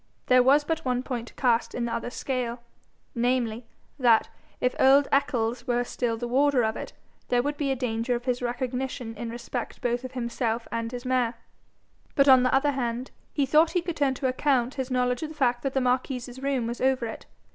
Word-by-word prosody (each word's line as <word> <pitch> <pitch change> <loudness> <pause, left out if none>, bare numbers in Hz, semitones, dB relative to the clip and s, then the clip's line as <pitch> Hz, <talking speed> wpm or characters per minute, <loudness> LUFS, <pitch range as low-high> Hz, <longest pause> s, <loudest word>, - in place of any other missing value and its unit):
There 255 0 +6
was 275 +4 +5
but 320 +1 -2
one 250 -1 0
point 240 -3 -4
to - - -13
cast 240 -3 +1
in 240 - -1
the 235 - -3
other 235 - -3
scale 245 -2 -3 0.5
namely, 240 -1 0 0.3
that, 235 -4 +4 0.3
if 250 - +1
old 275 +2 +6
Eccles 245 -3 0
were 245 0 +1
still 240 -1 -2
the 240 +1 -4
warder 270 0 +3
of 220 0 0
it, - - -7 0.3
there 245 0 +2
would 290 +1 -1
be 275 -2 0
danger 240 -1 -1
of 240 +1 -5
his 250 -1 0
recognition 250 0 -3
in 230 +2 -5
respect 240 +1 -5
both 245 +1 -1
of 255 0 -7
himself 235 -2 -2
and 230 0 -3
his 245 0 -6
mare. 255 -2 +1 0.8
But, 275 0 +4
on 260 -2 +8
the 255 - +2
other 280 +2 +3
hand, 250 -1 -3 0.2
he 280 - +1
thought 310 +4 +4
he 355 - +2
could 345 -2 -3
turn 275 -2 +2
to 260 - -1
account 255 -1 +1
his 265 -2 -4
knowledge 250 -1 0
of 315 - -3
the 315 - -10
fact 245 -4 +1
that 275 -1 -3
the - - +4
marquis's 250 0 -1
room 270 -3 0
was 235 +1 -4
over 260 -2 +2
it. 225 - -7
250 Hz, 210 wpm, -26 LUFS, 240-270 Hz, 0.8 s, on